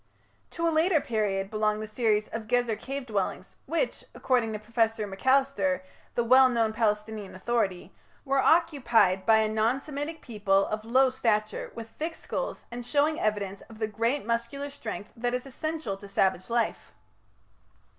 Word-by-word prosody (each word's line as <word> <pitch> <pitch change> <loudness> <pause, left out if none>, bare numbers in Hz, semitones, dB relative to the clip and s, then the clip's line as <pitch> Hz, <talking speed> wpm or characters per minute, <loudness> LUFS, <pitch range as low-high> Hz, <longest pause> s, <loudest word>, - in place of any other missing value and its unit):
To 335 0 -1
a 330 - +1
later 320 +1 +4
period 205 -5 -1
belong 215 -1 +1
the 215 - -4
series 215 -1 +1
of 225 -1 -5
Gezer 240 -1 +1
cave 275 +2 -5
dwellings, 200 -4 -3
which, 335 - -1
according 245 -4 +1
to - - -2
Professor 225 0 0
Macalister, 200 -3 +1 0.3
the 235 - +2
well 260 +2 +7
known 225 -3 +1
Palestinian 210 -2 -1
authority, 195 -3 -1 0.3
"were 275 0 +2
occupied 235 - +3
by 220 -1 +7
a 220 0 +3
non 220 +4 +1
Semitic 295 +3 -5
people 200 -4 +1
of 215 0 -3
low 260 +3 +4
stature, 215 -4 -1
with 230 -1 -7
thick 320 +7 -5
skulls - - -4
and 240 +1 -5
showing 295 +5 +1
evidence 200 -2 -1
of 225 - -12
the 220 - 0
great 230 +5 -1
muscular 235 +5 -2
strength 225 -6 -7
that 245 +1 -1
is 250 - -4
essential 310 -4 -4
to 200 - -11
savage 190 -1 +1
life". 235 -1 -1
230 Hz, 160 wpm, -28 LUFS, 210-265 Hz, 0.3 s, well